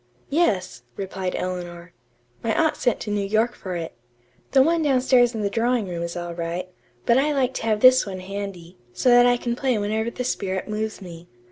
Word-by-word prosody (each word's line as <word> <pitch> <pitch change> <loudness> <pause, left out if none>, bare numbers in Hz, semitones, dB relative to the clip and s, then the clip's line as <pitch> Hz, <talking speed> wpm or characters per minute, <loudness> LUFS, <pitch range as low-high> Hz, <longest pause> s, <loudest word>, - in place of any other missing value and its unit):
"Yes," 190 - +1 0.2
replied 190 -1 -4
Eleanor. 175 -1 -5 0.5
"My 225 - 0
aunt 320 -1 +2
sent 245 - 0
to 210 - -4
New 205 0 0
York 220 +4 +1
for 185 -2 -6
it. 165 -1 -5 0.6
The 265 -1 +5
one 330 +3 +2
downstairs 255 -4 +3
in 220 - -2
the 200 - +1
drawing 230 -1 +1
room 175 -2 -4
is 170 0 -4
all 175 0 -5
right, 170 +2 -4 0.4
but 235 +2 +4
I 295 +2 +1
like 260 -2 +1
to 225 - -4
have 215 -1 +1
this 255 0 +7
one 190 -2 -6
handy, 185 -2 -7
so 255 - +1
that 245 0 +7
I 245 0 +3
can 240 0 -2
play 255 -2 0
whenever 215 +2 -1
the 250 - -5
spirit 190 -5 -2
moves 215 -1 -4
me. 170 -1 -11
210 Hz, 205 wpm, -23 LUFS, 185-245 Hz, 0.6 s, this